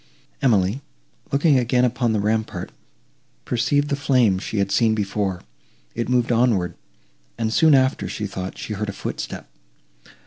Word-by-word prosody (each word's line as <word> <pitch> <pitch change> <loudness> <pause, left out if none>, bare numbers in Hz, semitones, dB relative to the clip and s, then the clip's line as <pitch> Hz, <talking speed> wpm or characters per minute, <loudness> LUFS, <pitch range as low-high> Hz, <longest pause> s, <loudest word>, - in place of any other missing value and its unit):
Emily, 110 -2 +2 0.5
looking 140 -1 +4
again 125 +1 +2
upon 125 -1 0
the 110 - +1
rampart, 105 -3 -2 0.7
perceived 145 +5 +1
the 140 - +1
flame 125 -9 +2
she 110 - -5
had 100 -1 0
seen 110 -2 +3
before; 100 -4 -2 0.5
it 120 - -3
moved 125 -1 +2
onward; 115 -8 +2 0.6
and, 110 -1 -1
soon 160 +1 +5
after, 130 0 +2
she 105 - -4
thought 95 -1 -6
she 110 - -5
heard 105 +1 -3
a - - -4
footstep. - - -6
115 Hz, 145 wpm, -22 LUFS, 100-125 Hz, 0.7 s, soon